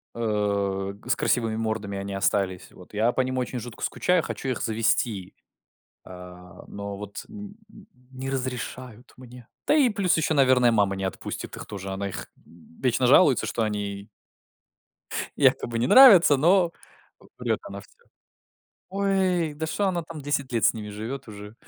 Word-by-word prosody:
э, 100 -3 -1
г 100 - -14
с - - +3
красивыми 115 -3 0
мордами 110 -3 -3
они 100 0 -5
остались. 95 -2 -1
Вот 90 - -16
я 110 +3 +2
по 130 - 0
ним 130 0 -2
очень 125 0 -3
жутко 120 0 -9
скучаю, 180 -2 +1
хочу - - -5
их 125 - -2
завезти. 110 -3 -1 0.7
А, 90 0 -12
но 100 0 -7
вот 100 0 -8
н 205 -1 -10 0.2
н 210 -2 -16 0.2
не 130 0 -6
разрешают 125 -2 -5
мне, 125 -1 -13 0.2
да, - - +4
и 280 -5 +4
плюс 200 -6 +1
ещё, 160 0 +1
наверное, 130 -3 +4
мама 100 -3 +2
не 95 - -3
отпустит 95 - -6
их - - -8
тоже. 100 -1 -7
Она 100 +1 -3
их - - -7 0.2
вечно 115 +10 -2
жалуется 140 0 +5
что 115 - -1
они 100 -1 -4 1.3
якобы 115 -1 +2
не 120 - +1
нравятся, 195 - +8
но 175 +4 +3 0.7
врёт - - -1
она - - -8
всё. - - -21 0.9
Ой, 190 -5 0
да, 160 +2 -4
шо 200 +5 -1
она 175 -2 -1
там 160 -1 -9
10 140 -2 -2
лет 115 -2 0
с - - +4
ними 105 -2 -7
живёт 110 +6 -6
уже. 105 0 -10
120 Hz, 165 wpm, -25 LUFS, 100-145 Hz, 1.3 s, нравятся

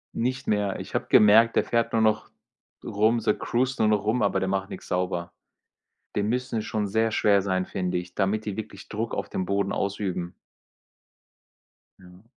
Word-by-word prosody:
Nicht 130 +3 -2
mehr. 105 -2 0
Ich - - -8
habe - - -1
gemerkt, 110 +2 +6
der - - +4
fährt 115 -1 0
nur 115 - +2
noch 110 -1 +1 0.6
rum, 110 +3 +2
so 105 - +2
cruised 125 +2 -1
nur 110 - +4
noch 105 -1 +2
rum, 110 +4 +1
aber 100 - +2
der 95 - -1
macht 95 0 -1
nichts - - -9
sauber. 90 -1 -2 0.8
Die 105 - +1
müssen 120 +2 -1
schon 105 -1 -2
sehr 110 +3 +1
schwer 100 -2 +3
sein, 95 -1 0
finde 90 -1 -3
ich, 90 0 -5
damit 105 +2 0
die 105 - -3
wirklich 105 -2 -8
Druck 110 +2 -3
auf - - -4
dem 95 - -2
Boden 100 0 0
ausüben. 95 -3 -2 1.7
Ja. 90 +1 -17
105 Hz, 180 wpm, -26 LUFS, 95-110 Hz, 1.7 s, gemerkt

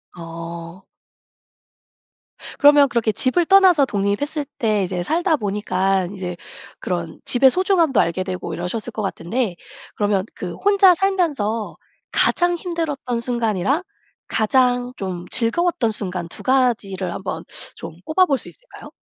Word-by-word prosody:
어. 170 +1 -8 1.8
그러면 290 -1 +6
그렇게 230 -2 +1
집을 300 +10 +1
떠나서 370 -6 +6
독립했을 245 +8 -1
때 215 -4 +1
이제 180 -1 -3
살다 335 - +1
보니깐 195 -3 -1
이제 180 -3 -5 0.4
그런 170 -3 -4
집의 265 +1 +5
소중함도 360 - +2
알게 170 +2 +1
되고 185 -3 -5
이러셨을 180 +7 -4
것 215 - -5
같은데 195 +1 -2 0.4
그러면 205 -2 0
그 180 -2 -5
혼자 395 -2 +5
살면서 300 - -1 0.4
가장 350 0 +2
힘들었던 310 -9 -3
순간이랑 235 - 0 0.4
가장 245 +2 +1
좀 180 -2 -5
즐거웠던 245 0 +1
순간 180 -5 -4
2 - - -9
가지를 220 -9 +1
한번 180 -4 -5 0.3
좀 165 - -8
꼽아볼 315 -4 +3
수 - - -9
있을까요? - - -14
225 Hz, 275 characters per minute, -21 LUFS, 185-295 Hz, 1.8 s, 그러면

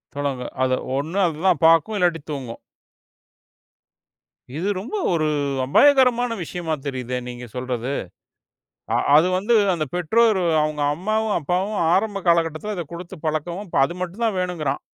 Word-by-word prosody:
தொடங்கு. 140 -3 -3 0.2
அத 130 - +1 0.2
ஒண்ணு 160 +8 -2
அதுதான் 165 0 0
பாக்கும். 165 +6 +4
இல்லாட்டி 170 -3 +1
தூங்கும். 130 -5 -6 2.0
இது 185 +5 -1
ரொம்ப 230 - -6 0.2
ஒரு 155 -2 +1 0.4
அபாயகரமான 245 - +4
விஷயமா 165 -1 -4
தெரியுதே! 125 -2 -3
நீங்கச் 120 -2 -9
சொல்றது. 125 0 -3 1.0
அ - - +3 0.2
அது 155 +3 +5
வந்து, 215 +5 +1 0.2
அந்தப் 155 -6 -3
பெற்றோரு 190 +3 +2 0.2
அவங்க 150 -1 -2
அம்மாவும், 215 +5 -1
அப்பாவும் 185 +7 -1 0.2
ஆரம்ப 200 0 0
கால 170 0 +6
கட்டத்துல 165 +7 -5
அதக் 170 -2 -6
குடுத்துப் 170 -1 -9
பழக்கம். 155 +5 -2 0.2
அது 140 - -4
மட்டும்தான் 200 +4 -2
வேணும்ங்கிறான். 165 -6 -2
170 Hz, 130 wpm, -22 LUFS, 145-200 Hz, 2.0 s, கால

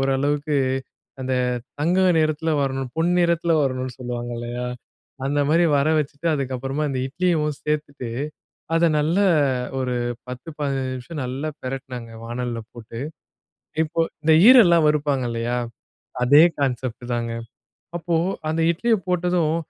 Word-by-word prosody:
ஓரளவுக்கு 145 +2 0 0.7
அந்த 130 0 -1 0.5
தங்க 175 +5 +2 0.2
நிறத்துல 155 +1 0
வரணும் 135 -2 -2
பொன்னிறத்துல 170 0 +2
வரணும்னு 130 -1 -2
சொல்லுவாங்க, 120 -1 -4
இல்லையா, 120 +1 -4 0.6
அந்த 145 +1 0
மாதிரி 170 +2 +4
வர 140 +2 +2
வச்சிட்டு 150 +3 -3
அதுக்கப்புறமா 135 +2 -2
இந்த 130 - -2
இட்லியும் 155 -2 0
சேர்த்துட்டு 145 -5 -3 0.7
அதை 165 +1 +4
நல்லா 170 +7 +2 0.6
ஒரு 125 -1 -1 0.3
பத்து 125 +5 -7
பதினைந்து 135 -2 -1
நிமிஷம் 140 +4 -6
நல்லா 130 +4 -3
பிரட்டுனேங்க 130 -3 -6
வாணல்ல 120 0 -3
போட்டு. 115 -1 -9 0.8
இப்போ 160 +1 -2 0.2
இந்த 160 0 +4
ஈரல்லாம் 175 -11 +7
வறுப்பாங்க 145 -3 +1
இல்லையா, 115 +1 -1 0.7
அதே 145 +5 +7 0.2
கான்செப்ட் 125 -2 -2
தாங்க. 115 -1 -2 0.7
அப்போ 170 0 -1 0.3
அந்த 160 +1 0
இட்லியை 225 +5 +1
போட்டதும் 175 -3 +1
140 Hz, 120 wpm, -23 LUFS, 125-160 Hz, 0.8 s, ஈரல்லாம்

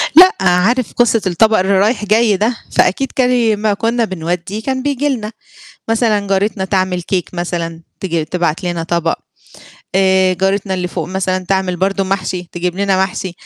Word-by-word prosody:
لأ، 370 +3 +9
عارف 205 +7 +2
قصة 235 -2 +2
الطبق 220 +4 +3
اللي 190 +1 +2
رايح 215 +1 +1
جاي 215 -1 +3
ده، 230 +4 0
فأكيد 270 +8 +1
كان 250 -1 +2
ي 230 -3 +2
ما 210 0 0
كنّا 230 +2 0
بنودّيه 180 +3 -4
كان 260 -1 -2
بييجي 285 +1 0
لنا، 220 -5 -3 0.6
مثلًا 220 -3 +1
جارتنا 195 0 0
تعمل 185 -2 0
cake 180 - -1
مثلًا، 170 -1 -3 0.2
تيجي 170 -4 -1
تبعت 170 +1 -2
لنا 175 -2 -2
طبق، 170 0 0 0.8
آآ، 190 -1 +3
جارتنا 195 +1 0
اللي 180 -1 -2
فوق 165 -3 -4
مثلًا 185 0 -1
تعمل 190 -2 0
برضه 195 +2 0
محشي 185 -2 -3
تجيب 175 +1 -3
لنا 195 -1 +2
محشي. 185 -1 -5
190 Hz, 165 wpm, -16 LUFS, 180-220 Hz, 0.8 s, لأ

